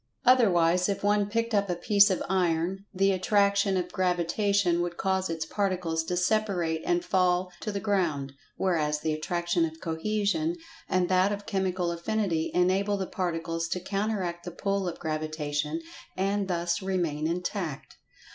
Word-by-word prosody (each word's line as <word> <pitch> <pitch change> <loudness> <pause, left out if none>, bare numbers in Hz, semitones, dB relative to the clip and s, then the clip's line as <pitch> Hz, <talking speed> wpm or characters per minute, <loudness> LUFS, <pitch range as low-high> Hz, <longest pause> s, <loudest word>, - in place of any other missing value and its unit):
Otherwise, 180 -8 +4
if 200 - -2
one 205 0 +2
picked 230 +1 -1
up 200 -1 +2
a 175 - 0
piece 205 +3 +5
of 190 - 0
iron, 180 +1 0
the 195 0 +2
At[Pg 185 -1 -2
153]traction 200 -1 +3
of 180 -1 -2
Gravitation 180 0 +1
would 175 -1 -3
cause 190 -1 0
its 165 -1 -2
particles 180 -4 -1
to 180 +2 -2
separate 180 -4 +1
and 350 0 +1
fall 180 - +2
to 215 - -4
the 200 - -3
ground, 170 -9 0 0.2
whereas, 150 -5 0
the 155 0 0
Attraction 175 +2 0
of 160 0 -3
Cohesion 215 - -1 0.3
and 185 -1 +2
that 185 +2 +3
of 205 0 -4
Chemical 185 -2 -1
Affinity 170 -2 -1
enable 190 +3 +2
the 190 - -2
Particles 165 -2 -2
to 180 - -2
counteract 195 -3 -2
the 175 - -5
pull 195 +2 -2
of 170 - -7
Gravitation, 155 -1 -2 0.4
and 195 +1 0
thus 170 -1 -1
remain 170 -6 -1
intact. 175 -3 -4
185 Hz, 155 wpm, -28 LUFS, 170-200 Hz, 0.4 s, piece